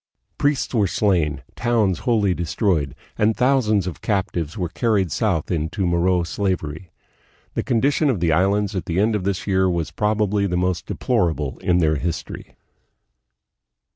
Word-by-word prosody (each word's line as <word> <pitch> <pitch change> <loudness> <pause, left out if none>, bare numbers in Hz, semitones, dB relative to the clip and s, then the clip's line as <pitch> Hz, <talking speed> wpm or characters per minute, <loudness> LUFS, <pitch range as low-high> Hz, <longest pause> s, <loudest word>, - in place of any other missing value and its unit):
Priests 145 -2 +1
were 105 -5 +3
slain, 85 -8 0
towns 110 -6 +1
wholly 105 -6 +2
destroyed, 85 - -1 0.2
and 105 +1 +2
thousands 125 -7 +2
of 90 -4 -6
captives 95 -4 -2
were 90 -3 -1
carried 100 -1 0
south 85 -2 0
into 85 +4 -1
Moro 90 +1 +2
slavery. 85 -2 -3 0.6
The - - -1
condition 140 +5 +1
of 120 -8 0
the 85 -1 +1
Islands 100 +4 +1
at 95 - -3
the 85 +2 -1
end 110 +2 +2
of 95 -3 -2
this 100 -2 -1
year 95 -1 +2
was 85 -4 -2
probably 105 -1 +1
the 90 -1 -1
most 90 -1 -1
deplorable 75 -6 -1
in 90 - +1
their 80 -3 +2
history. 80 +2 -5
95 Hz, 150 wpm, -22 LUFS, 85-105 Hz, 0.6 s, were